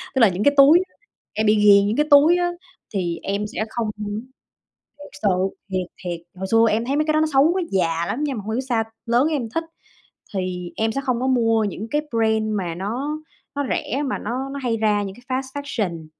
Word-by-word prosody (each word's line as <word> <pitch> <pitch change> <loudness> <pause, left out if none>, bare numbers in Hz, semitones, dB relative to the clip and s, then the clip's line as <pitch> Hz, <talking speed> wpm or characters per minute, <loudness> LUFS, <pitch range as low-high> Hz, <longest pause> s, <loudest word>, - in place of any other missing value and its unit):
Tức - - +2
là 225 - +7
những 185 +2 -2
cái 285 - +4
túi, 285 +5 +8 0.5
em 215 - 0
bị 210 - +5
nghiền 205 -1 +6
những 215 - 0
cái 300 - +3
túi 300 +5 +7
á 350 0 0 0.4
thì 175 -4 -2
em 200 +2 -2
sẽ 215 0 -3
không 230 -1 -2
muốn 210 +1 -4 0.8
thiệt 290 - -11
sự, 205 - +3 0.4
thiệt, 185 -2 -2 0.2
thiệt, 175 -2 -3 0.2
hồi 190 +1 -5
xưa 225 0 +5
em 225 +2 0
thấy 275 - -1
mấy 305 +1 +1
cái 310 - +1
đó 310 - +3
xấu, 285 +5 +5
nó 375 - +1
già 170 -3 +1
lắm 285 +10 -2
nhưng 275 -5 -2
mà 205 - -5
hông 215 - -4
hiểu 250 - 0
sao 240 -4 0 0.2
lớn 240 +4 +3
em 280 -8 -2
thích. 330 - +1 0.7
Thì 180 -2 -3
em 220 0 0
sẽ 275 - -2
không 250 -2 0
có 260 - 0
mua 225 -4 +2
những 205 +2 -4
cái 295 0 +1
brand 220 -1 +1
mà 180 -5 -2
nó 245 - -3 0.4
nó 285 0 -1
rẻ 275 +4 -1
mà 260 - -2
nó 255 +5 -3
nó 280 +1 -6
hay 235 -2 0
ra 210 -2 +1
những 195 -1 -5
cái 255 +1 -3
fast 270 +2 -7
fashion, 185 - -3
225 Hz, 230 wpm, -22 LUFS, 200-275 Hz, 0.8 s, túi